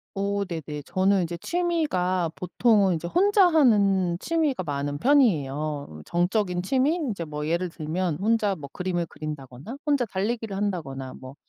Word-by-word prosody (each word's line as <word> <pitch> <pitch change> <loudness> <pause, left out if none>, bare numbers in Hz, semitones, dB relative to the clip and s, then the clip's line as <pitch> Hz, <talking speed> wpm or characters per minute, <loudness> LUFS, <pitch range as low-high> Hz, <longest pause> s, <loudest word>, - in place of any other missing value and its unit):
어 200 +1 0
네네. 160 -5 -5
저는 190 0 +2
이제 170 0 -4
취미가 185 - 0
보통은 195 0 +2
이제 165 +1 -4
혼자 395 - +4
하는 200 - +3
취미가 305 - 0
많은 145 -2 -3
편이에요. 150 - +1
정적인 180 +1 0
취미? 265 - +2
인제 235 - -3
뭐 150 -1 -5
예를 170 +2 0
들면 165 +1 -2
혼자 210 -1 +2
뭐 140 -5 -9
그림을 180 -2 -2
그린다거나, 150 - -8
혼자 285 -4 +2
달리기를 215 +1 -3
한다거나, 135 -10 -3
뭐 130 +1 -11
185 Hz, 325 characters per minute, -25 LUFS, 155-225 Hz, -, 혼자